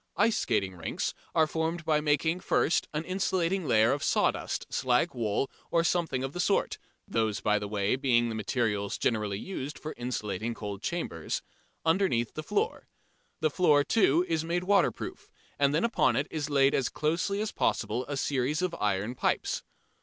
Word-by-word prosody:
Ice 230 Hz, -, +4 dB
skating 95 Hz, -1 st, 0 dB
rinks 85 Hz, -, -3 dB, 0.2 s
are 160 Hz, -1 st, +5 dB
formed 160 Hz, +2 st, -2 dB
by 155 Hz, -1 st, +2 dB
making, 150 Hz, +3 st, +1 dB
first, 175 Hz, -, +1 dB
an 150 Hz, +1 st, -2 dB
insulating 185 Hz, -1 st, 0 dB
layer 110 Hz, +1 st, +4 dB
of 140 Hz, -, -1 dB
sawdust, -, -, 0 dB
slag 130 Hz, +6 st, +2 dB
wool 115 Hz, +1 st, 0 dB, 0.2 s
or 170 Hz, -1 st, +2 dB
something 165 Hz, -6 st, 0 dB
of 135 Hz, +1 st, -4 dB
that 180 Hz, -, -5 dB
sort 195 Hz, +3 st, +1 dB, 0.3 s
(those 110 Hz, -2 st, 0 dB
by 105 Hz, 0 st, +2 dB
the 105 Hz, -, -4 dB
way, 100 Hz, +2 st, 0 dB
being 125 Hz, -3 st, +2 dB
the 115 Hz, -, -3 dB
materials 105 Hz, -2 st, -1 dB
generally 105 Hz, -4 st, 0 dB
used 150 Hz, -, -5 dB
for 155 Hz, -, -6 dB
insulating 115 Hz, -2 st, -3 dB
cold 100 Hz, -3 st, -6 dB
chambers) 95 Hz, -, -3 dB, 0.4 s
underneath 160 Hz, -, +2 dB
the 155 Hz, -, -4 dB
floor. 425 Hz, -, -1 dB, 0.5 s
The 155 Hz, -1 st, +2 dB
floor, 150 Hz, -3 st, +4 dB
too, 175 Hz, -3 st, +3 dB
is 160 Hz, -1 st, 0 dB
made 175 Hz, +2 st, -1 dB
waterproof 200 Hz, +2 st, 0 dB, 0.3 s
and 140 Hz, -1 st, +4 dB
then 155 Hz, +3 st, +1 dB
upon 235 Hz, 0 st, +2 dB
it 140 Hz, -, +1 dB
is 150 Hz, -2 st, -3 dB
laid 140 Hz, -1 st, +4 dB
as 130 Hz, -, +1 dB
closely 165 Hz, +7 st, -1 dB
as 215 Hz, 0 st, -2 dB
possible 110 Hz, +3 st, 0 dB
a 145 Hz, -1 st, -3 dB
series 140 Hz, +4 st, 0 dB
of 180 Hz, -2 st, 0 dB
iron 105 Hz, +3 st, 0 dB
pipes. -, -, 0 dB
145 Hz, 170 wpm, -29 LUFS, 115-170 Hz, 0.5 s, are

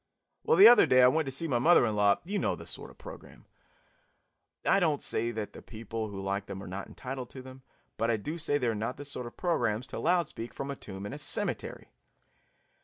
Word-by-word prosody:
Well, 470 Hz, +1 st, +3 dB
the 395 Hz, -, +11 dB
other 245 Hz, -, +7 dB
day 130 Hz, 0 st, +5 dB
I -, -, +8 dB
went 155 Hz, +3 st, +1 dB
to -, -, -3 dB
see 150 Hz, +5 st, -3 dB
my 125 Hz, -5 st, +1 dB
mother 160 Hz, 0 st, +5 dB
in 110 Hz, -2 st, -1 dB
law 100 Hz, -1 st, +3 dB
" -, -, -37 dB
You 200 Hz, +3 st, -2 dB
know -, -, 0 dB
the -, -, -11 dB
sort -, -, -7 dB
of -, -, -17 dB
program. -, -, -12 dB, 1.2 s
I 195 Hz, -, +4 dB
don't 160 Hz, -6 st, +1 dB
say 115 Hz, +1 st, 0 dB
that 110 Hz, -3 st, -5 dB
the -, -, -11 dB
people 115 Hz, 0 st, -6 dB
who 100 Hz, -1 st, -7 dB
like 100 Hz, +1 st, -3 dB
them 95 Hz, 0 st, -7 dB
are -, -, -9 dB
not 95 Hz, +2 st, -6 dB
entitled 130 Hz, -1 st, -7 dB
to 130 Hz, -, -9 dB
them, 130 Hz, 0 st, -12 dB, 0.4 s
but 115 Hz, -, 0 dB
I 115 Hz, -, +2 dB
do 150 Hz, +11 st, -5 dB
say 145 Hz, -2 st, +1 dB
they 130 Hz, -, -2 dB
are 115 Hz, -, +1 dB
not 110 Hz, +4 st, -3 dB
the 145 Hz, -, -8 dB
sort 125 Hz, -4 st, -5 dB
of 120 Hz, -, -13 dB
programs 120 Hz, -10 st, 0 dB
to -, -, -5 dB
loud 175 Hz, -1 st, +2 dB
speak 115 Hz, +1 st, -8 dB
from 140 Hz, +1 st, -4 dB
a -, -, -5 dB
tomb 95 Hz, -5 st, -9 dB
in 105 Hz, -, -6 dB
a 145 Hz, -, -7 dB
cemetery. 140 Hz, -, -3 dB
125 Hz, 250 wpm, -29 LUFS, 110-145 Hz, 1.2 s, the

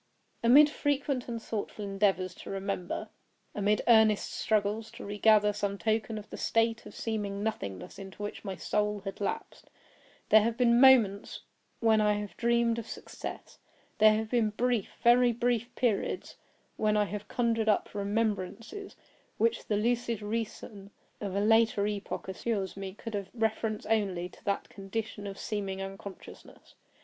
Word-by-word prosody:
Amid 275 Hz, +6 st, +8 dB
frequent 285 Hz, -3 st, -1 dB
and 235 Hz, -1 st, -3 dB
thoughtful 215 Hz, -1 st, -5 dB
endeavors 195 Hz, -2 st, +1 dB
to -, -, -11 dB
remember; 195 Hz, -2 st, -3 dB, 0.4 s
amid 210 Hz, +1 st, +1 dB
earnest 220 Hz, -3 st, +5 dB
struggles 215 Hz, +1 st, 0 dB
to -, -, -9 dB
regather 210 Hz, 0 st, +4 dB
some 200 Hz, -1 st, -2 dB
token 220 Hz, +1 st, -1 dB
of 210 Hz, -, -8 dB
the -, -, -6 dB
state 225 Hz, 0 st, +1 dB
of -, -, -12 dB
seeming 205 Hz, -3 st, -3 dB
nothingness 100 Hz, -, -4 dB
into 195 Hz, +1 st, -8 dB
which 205 Hz, -, -6 dB
my 195 Hz, -3 st, -4 dB
soul 210 Hz, +2 st, -1 dB
had 195 Hz, 0 st, -7 dB
lapsed, 200 Hz, -, -4 dB, 0.6 s
there 215 Hz, -, +8 dB
have 230 Hz, +2 st, -1 dB
been 235 Hz, -1 st, +4 dB
moments 230 Hz, -7 st, +5 dB, 0.4 s
when 220 Hz, -2 st, +4 dB
I 210 Hz, 0 st, +3 dB
have 205 Hz, -1 st, -5 dB
dreamed 235 Hz, 0 st, +2 dB
of 225 Hz, -, -7 dB
success; -, -, -8 dB, 0.4 s
there 215 Hz, 0 st, +7 dB
have 220 Hz, 0 st, -3 dB
been 235 Hz, -3 st, +3 dB
brief, 235 Hz, 0 st, 0 dB
very 240 Hz, 0 st, +6 dB
brief 240 Hz, 0 st, 0 dB
periods 230 Hz, -6 st, -1 dB, 0.4 s
when 215 Hz, -1 st, +2 dB
I 210 Hz, -, +4 dB
have 205 Hz, +1 st, -6 dB
conjured 230 Hz, -2 st, +1 dB
up 210 Hz, -, +1 dB
remembrances 210 Hz, -, -2 dB, 0.4 s
which 230 Hz, +1 st, +1 dB
the 210 Hz, -, +1 dB
lucid 235 Hz, 0 st, 0 dB
reason 210 Hz, -2 st, -5 dB, 0.3 s
of 200 Hz, -2 st, -4 dB
a -, -, +2 dB
later 225 Hz, -1 st, +4 dB
epoch 205 Hz, -2 st, -4 dB
assures 195 Hz, 0 st, -2 dB
me 195 Hz, -1 st, -6 dB
could 230 Hz, +1 st, -8 dB
have 200 Hz, -2 st, -3 dB
had 235 Hz, -, -16 dB
reference 220 Hz, 0 st, -1 dB
only 195 Hz, -5 st, 0 dB
to -, -, -19 dB
that 200 Hz, -1 st, -1 dB
condition 205 Hz, +1 st, -5 dB
of 195 Hz, 0 st, -7 dB
seeming 195 Hz, -3 st, -3 dB
unconsciousness. 195 Hz, 0 st, -10 dB
215 Hz, 155 wpm, -30 LUFS, 200-230 Hz, 0.6 s, Amid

